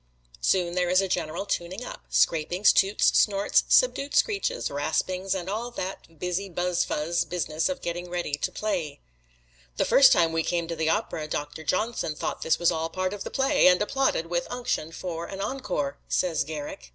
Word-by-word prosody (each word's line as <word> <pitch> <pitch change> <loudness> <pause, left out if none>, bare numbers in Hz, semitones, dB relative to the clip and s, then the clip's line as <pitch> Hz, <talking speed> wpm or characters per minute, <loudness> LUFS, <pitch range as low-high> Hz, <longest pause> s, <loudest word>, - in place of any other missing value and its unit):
Soon 175 - +1
there 180 -1 +1
is 185 +1 +4
a 195 - +1
general 170 0 -2
tuning 185 +5 -3
up - - -9
scrapings, 175 +5 +3
toots, 195 +2 +3
snorts, 200 -1 +3
subdued 290 - +3
screeches, 460 +3 +1
raspings, 180 +6 -1
and 180 -1 -4
all 220 +5 -3
that 185 -7 -7
busy 180 +4 -2
buzz 175 0 0
fuzz 170 +3 -1
business 165 - -2
of 275 -1 -4
getting 175 +1 -4
ready 175 -4 -3
to 145 - -1
play. 180 -9 -3 0.8
"The - - +2
first 275 - +7
time 165 -1 +4
we 165 - +1
came 170 0 -1
to 165 - -4
the 160 0 0
opera 165 -6 -1
Doctor 150 +1 -4
Johnson 185 -2 -1
thought - - -4
this 160 - +2
was 170 0 +3
all 160 -1 -1
a - - -16
part 185 +2 -2
of 205 - -5
the - - -5
play, 270 -6 +3
and 180 0 +5
applauded 240 -5 0
with 175 +1 -2
unction 245 -10 -2
for 170 -1 -5
an 195 - -7
encore," 195 - -3
says 175 -3 +1
Garrick. 150 - -7
180 Hz, 190 wpm, -26 LUFS, 165-200 Hz, 0.8 s, first